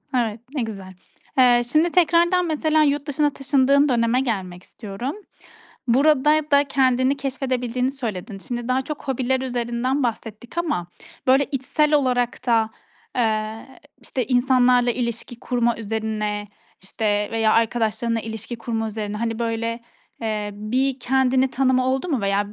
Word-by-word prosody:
Evet, 230 -3 0 0.2
ne 275 - 0
güzel. 195 -5 -6 0.4
Eee, 245 -1 +6
şimdi 315 +3 +3
tekrardan 345 +1 +3
mesela 310 0 +2
yurt 290 -1 +1
dışına 295 +1 +1
taşındığın 280 +1 +2
döneme 235 0 +2
gelmek 190 -8 -3
istiyorum. 225 +8 -6 0.7
Burada 300 +4 +3
da 285 0 +6
kendini 260 0 +2
keşfedebildiğini 255 -2 -2
söyledin. 215 -7 -5
Şimdi 240 -1 -4
daha 255 +1 +1
çok 295 +1 -7
hobiler 260 0 0
üzerinden 250 +2 -1
bahsettik 230 +3 -5
ama 300 - -1 0.4
böyle 270 +2 +5
içsel 295 +3 0
olarak 250 -4 +1
da, 225 -3 +2 0.5
eee, 220 +1 -2 0.2
işte 250 +1 -3
insanlarla 250 -1 +3
ilişki 235 0 -4
kurma 240 -2 0
üzerine, 215 -1 -3 0.4
işte, 205 +1 -1
veya 225 -1 +2
arkadaşlarınla 230 0 +1
ilişki 225 +1 -6
kurma 225 -1 -3
üzerine, 210 -1 -4
hani, 225 0 -2
böyle, 230 0 -2 0.4
eee, 215 -2 -2
bir 250 +6 -1
kendini 260 +1 +2
tanıma 255 0 +2
oldu 265 +6 0
mu? 270 -8 0
Veya 200 +1 0
245 Hz, 135 wpm, -22 LUFS, 225-270 Hz, 0.7 s, Eee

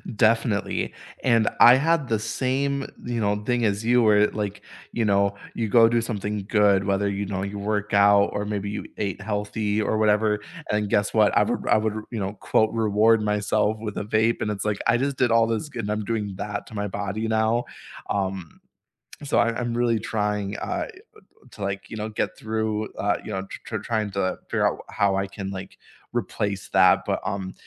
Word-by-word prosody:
Definitely, 110 -1 +1 0.3
and 115 -3 +3
I 120 +1 +9
had 150 0 +1
the 110 -2 0
same, 130 +5 -1 0.2
you 120 -1 -2
know, 105 -1 +1
thing 120 0 +1
as 100 +1 0
you 120 +1 +4
where, 105 -1 +5
like, 105 -1 -4 0.3
you 115 - -1
know, 100 0 +2 0.2
you 115 -2 -1
go 115 +1 +6
do 120 0 +2
something 105 -3 -3
good, 100 -3 +4
whether, 100 0 +1
you 100 +1 -2
know, 95 -1 -3
you 100 +1 -5
work 105 0 -2
out 100 0 +6
or 105 0 -3
maybe 100 -1 -3
you 105 - -5
ate 100 -1 -3
healthy 105 +1 -1
or 110 - 0
whatever, 105 0 +2 0.3
and 105 -1 0
guess 105 0 +1
what? 110 -2 +4
I - - +6
r - - +3
would - - -8
I - - +5
would, 110 0 0 0.2
you 115 - -3
know, 95 +1 -2
quote, 110 +1 +1
"reward 110 0 +3
myself" 105 +1 +1
with 105 -2 -5
a - - -2
vape, 110 +2 +1
and 105 - 0
it's, 100 0 -4
like, 105 -1 -1
I 120 +1 +4
just 135 +1 -1
did 125 -3 +2
all 115 0 +4
this 115 +7 -2
good 115 -6 -5
and 105 - -2
I'm 105 -1 -2
doing 105 -4 -2
that 100 0 -4
to 110 - -11
my 105 0 -2
body 100 +3 -3
now, 110 +2 +1 0.4
um, 95 -4 -3 0.6
so, 140 - +1
I 115 -1 +2
I'm 120 -1 -2
really 120 -2 +2
trying, 105 -2 -2
uh, - - -3 0.6
to, - - -13
like, 100 0 -3
you 110 - -6
know, 105 +1 -3
get 105 - -3
through, 110 -1 -2
uh, 100 +1 0
you 110 - -7
know, 95 -1 -2
tr - - -9
tr - - -3
trying 110 -3 -2
to 95 -1 -1
figure - - +1
out - - -2
how 100 -2 +1
I 95 0 -1
can, 95 0 -6
like, 95 -1 -8 0.4
replace 100 -3 -2
that, 95 -1 +5
but, - - 0
um, 95 -1 -3
105 Hz, 210 wpm, -24 LUFS, 100-115 Hz, 0.6 s, I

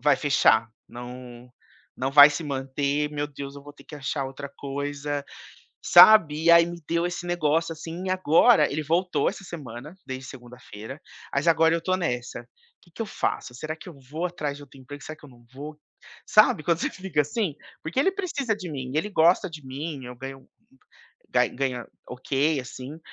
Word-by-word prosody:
"Vai 145 0 +4
fechar. 115 -6 +3 0.2
Não 125 0 -10 0.5
não 130 +1 -2
vai 145 +1 +10
se 145 +3 -4
manter. 140 +1 -1
Meu 145 0 -2
Deus, 140 -1 -8
eu 140 - -11
vou 145 0 -12
ter - - -18
que - - -11
achar 140 -1 -3
outra 140 +1 -7
coisa", 145 +1 -4 0.6
sabe. 175 -4 +7
E 170 - +6
aí 170 0 +7
me 170 0 -7
deu 170 +1 +1
esse 175 0 -5
negócio 165 -1 0
assim. 165 +3 -7
E 185 - -1
agora, 185 0 +4
ele 155 +2 -2
voltou 175 +4 +1
essa - - -6
semana, 150 -4 -9
desde 130 0 -6
segunda-feira, 125 0 -11 0.3
mas 140 +4 -1
agora 165 0 +4
eu 170 - 0
tô 185 0 +1
nessa: 125 -9 -3 0.4
"Que 175 - -23
que 170 - -15
eu - - -5
faço? 130 -10 -3
Será 155 +5 -5
que 155 - -12
eu 175 - -10 0.2
vou 165 +4 -2
atrás 150 -5 -4
de 145 - -12
outro 135 0 -18
emprego? 145 +2 -10
Será 155 - -8
que 150 - -19
eu 145 - -13
não 120 -1 -19
vou?". 150 +3 -9 0.5
Sabe, 215 -7 +4
quando 170 0 +2
você - - -1
fica 185 -5 -2
assim? 170 +2 -2 0.3
Porque 160 +7 -7
ele 385 - +3
precisa 290 - -2
de 185 -4 -7
mim, 130 -3 -5
ele 185 +7 0
gosta 180 +2 +3
de 155 -3 -10
mim. 140 +1 -6
Eu 125 0 -9
ganho 135 +1 -9 0.8
ga - - +3
ganha 125 -2 -3 0.2
ok, 140 +4 0
assim. 130 +4 -9
150 Hz, 190 wpm, -25 LUFS, 135-170 Hz, 0.8 s, vai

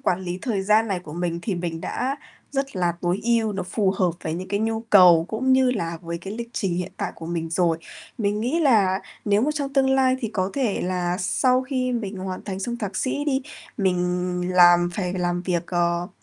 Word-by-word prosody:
quản 180 +1 0
lý 180 0 -4
thời 210 -7 -1
gian 215 +2 +3
này 190 -2 -1
của 155 -4 -10
mình 170 0 -2
thì 200 - -1
mình 170 -2 -4
đã 265 +3 -2 0.3
rất 275 -5 -2
là 175 -1 +1
tối 180 +3 0
ưu, 230 -2 +2
nó 195 - -3
phù 190 +2 0
hợp 185 -2 +1
với 160 0 -2
những 185 +2 -6
cái 200 +1 -1
nhu 225 0 0
cầu 180 -7 +6
cũng 260 +4 +1
như 260 -1 +4
là 170 -8 -3
với 170 0 -4
cái 195 +4 -7
lịch 235 0 -5
trình 190 -4 -1
hiện 180 +1 -3
tại - - -3
của 165 - -9
mình 165 -1 -3
rồi. 170 -1 +1 0.4
Mình 210 0 0
nghĩ 280 +9 0
là 205 -9 +3 0.2
nếu 205 +1 +3
mà 295 - +2
trong 280 -2 -3
tương 265 -1 +3
lai 260 -1 +3
thì 225 - -2
có 185 -1 -1
thể 255 -7 0
là 180 -1 -1
sau 255 +6 +2
khi 255 -1 -1
mình 210 -4 -3
hoàn 185 0 -5
thành 195 -2 -5
xong 240 +4 -3
thạc 205 -5 -4
sĩ 285 +2 -1
đi, 270 -2 0 0.3
mình 190 -4 +1 0.6
làm 175 0 +6
phải 180 -3 -2
làm 175 -1 -1
việc, 175 -2 -1
ờ, 175 0 0
195 Hz, 225 wpm, -24 LUFS, 175-235 Hz, 0.6 s, cầu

